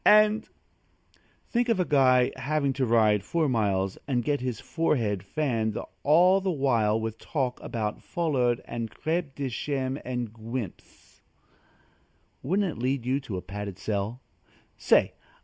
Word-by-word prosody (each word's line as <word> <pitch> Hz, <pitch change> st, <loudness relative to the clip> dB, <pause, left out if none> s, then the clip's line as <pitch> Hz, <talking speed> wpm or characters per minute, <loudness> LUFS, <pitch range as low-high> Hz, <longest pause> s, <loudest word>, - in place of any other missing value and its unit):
and 215 Hz, +1 st, +5 dB, 0.5 s
" -, -, -36 dB
Think 240 Hz, 0 st, +1 dB
of 225 Hz, -4 st, +2 dB
a 180 Hz, -, +2 dB
guy 130 Hz, -4 st, +4 dB
having 140 Hz, +1 st, 0 dB
to 130 Hz, -1 st, 0 dB
ride 110 Hz, -3 st, +4 dB
four 165 Hz, +4 st, 0 dB
miles 100 Hz, -6 st, 0 dB
and 125 Hz, -4 st, 0 dB
get 145 Hz, -2 st, 0 dB
his 125 Hz, -4 st, -3 dB
forehead 115 Hz, -, 0 dB
fanned 110 Hz, -, -1 dB, 0.2 s
all 180 Hz, +6 st, +5 dB
the 190 Hz, -, -1 dB
while 120 Hz, -9 st, +2 dB
with 110 Hz, 0 st, -4 dB
talk 130 Hz, -5 st, -2 dB
about 105 Hz, -2 st, -3 dB
foulard 130 Hz, -8 st, 0 dB
and 115 Hz, -1 st, -4 dB
crêpe 160 Hz, -1 st, -2 dB
de 140 Hz, -1 st, -2 dB
chine 130 Hz, +1 st, -2 dB
and 125 Hz, -3 st, -3 dB
guimpes! 115 Hz, -2 st, -8 dB, 1.2 s
Wouldn't 190 Hz, +5 st, +1 dB
it -, -, -6 dB
lead 130 Hz, -1 st, 0 dB
you 130 Hz, +2 st, +1 dB
to 110 Hz, -9 st, -5 dB
a 90 Hz, -, -6 dB
padded 100 Hz, 0 st, -6 dB
cell? 105 Hz, +4 st, -3 dB, 0.5 s
Say! -, -, +3 dB
130 Hz, 150 wpm, -27 LUFS, 110-150 Hz, 1.2 s, and